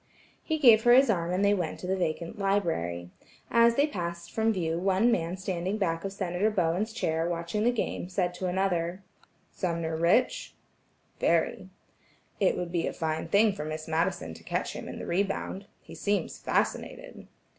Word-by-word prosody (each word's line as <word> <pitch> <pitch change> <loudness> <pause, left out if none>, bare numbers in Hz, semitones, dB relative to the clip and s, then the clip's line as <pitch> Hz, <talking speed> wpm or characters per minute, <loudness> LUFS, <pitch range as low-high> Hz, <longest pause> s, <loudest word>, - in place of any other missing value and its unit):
He 315 - -1
gave 235 -7 +7
her 240 - +7
his 260 -1 +6
arm 170 -3 -1
and 190 +3 +1
they 200 - +5
went 175 -6 -2
to - - -6
the 190 +1 0
vacant 170 +1 -3
library. 125 - -1 0.4
As 235 0 +5
they 285 - +4
passed 170 - -5
from 225 0 +2
view 170 -4 -1
one 195 +5 +3
man 175 -3 -1
standing 190 +1 -2
back 165 -5 -1
of 195 - -3
Senator 195 +1 0
Bowen's 185 +2 0
chair 165 -6 -1
watching 170 +5 -2
the 245 - +5
game 215 -6 -3
said 180 -1 0
to 185 +1 -3
another: 180 -1 -1 0.5
"Sumner 170 -3 -2
rich?" 240 - +1 0.6
"Very." - - +1 0.7
"It 195 - +2
would 175 -1 -3
be 170 -1 0
a - - -3
fine 160 0 -2
thing 205 +4 +4
for 195 - -5
Miss 155 0 -5
Madison 160 - -1
to - - -13
catch - - -2
him - - -7
in - - -7
the - - -6
rebound. 195 +1 -2 0.2
He - - -12
seems 205 0 -1
fascinated." - - -2
185 Hz, 175 wpm, -28 LUFS, 170-205 Hz, 0.7 s, gave